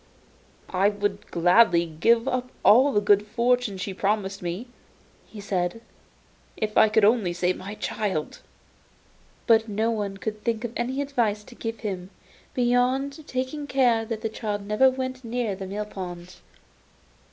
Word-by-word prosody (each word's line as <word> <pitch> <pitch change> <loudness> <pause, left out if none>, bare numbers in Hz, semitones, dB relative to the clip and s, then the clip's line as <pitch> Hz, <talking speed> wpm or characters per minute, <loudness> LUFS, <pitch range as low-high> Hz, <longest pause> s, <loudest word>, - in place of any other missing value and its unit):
'I 195 +2 +3
would 205 -1 -3
gladly 175 0 +4
give 230 +10 +2
up 255 -1 -1 0.2
all 260 +7 +7
the 205 - +3
good 205 0 +4
fortune 240 -2 +1
she 190 +1 -4
promised 195 0 -1
me,' 175 +6 -4 0.6
he 215 - -11
said, 190 0 -2 0.8
'if 215 -1 -2
I 220 - +6
could 215 -1 +4
only 210 -5 +3
save 180 +1 0
my 200 +3 -7
child.' 195 -8 -3 1.1
But 225 -1 +4
no 220 +3 0
one 205 -3 -3
could 215 +2 -5
think 230 -1 -1
of 235 -1 -4
any 260 +4 -1
advice 230 -7 -1
to 245 - -14
give 225 -2 -6
him, 185 -4 -4 0.5
beyond 255 +4 +1
taking 260 +3 -3
care 245 -5 +3
that 220 -1 -4
the 225 - -2
child 205 -2 -4
never 210 +6 +4
went 260 0 -4
near 235 -3 -2
the 190 0 -7
mill 205 +2 -4
pond. 180 -3 -8
215 Hz, 150 wpm, -25 LUFS, 195-245 Hz, 1.1 s, all